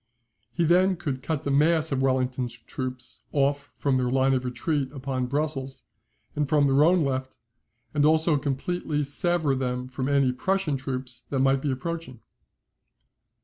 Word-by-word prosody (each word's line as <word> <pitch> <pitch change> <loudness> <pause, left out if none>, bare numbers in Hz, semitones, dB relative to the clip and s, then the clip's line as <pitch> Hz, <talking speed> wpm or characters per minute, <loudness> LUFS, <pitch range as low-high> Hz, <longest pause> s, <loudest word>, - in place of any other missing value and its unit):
He 170 - 0
then 185 +3 +4
could 145 -7 -4
cut 155 0 -2
the 140 - -1
mass 155 +2 +3
of 135 -1 0
Wellington's 130 -2 0
troops 130 +1 -5
off 140 0 0
from 140 -2 +1
their 125 -1 0
line 135 +1 +3
of 130 -1 0
retreat 130 +3 -2
upon 130 -2 -3
Brussels, 140 -1 -2 0.5
and 145 -2 -1
from 150 -2 +4
their 140 +1 +4
own 170 -1 +4
left, 130 -1 -3 0.6
and 145 -1 +2
also 155 0 +4
completely 150 +2 -2
sever 155 +1 +2
them 125 -1 -2
from 130 +1 -3
any 140 -2 +3
Prussian 180 +3 0
troops 130 -2 -5
that 140 - -2
might 135 0 +3
be 145 - -1
approaching. 135 -1 -4
135 Hz, 155 wpm, -26 LUFS, 130-155 Hz, 0.6 s, then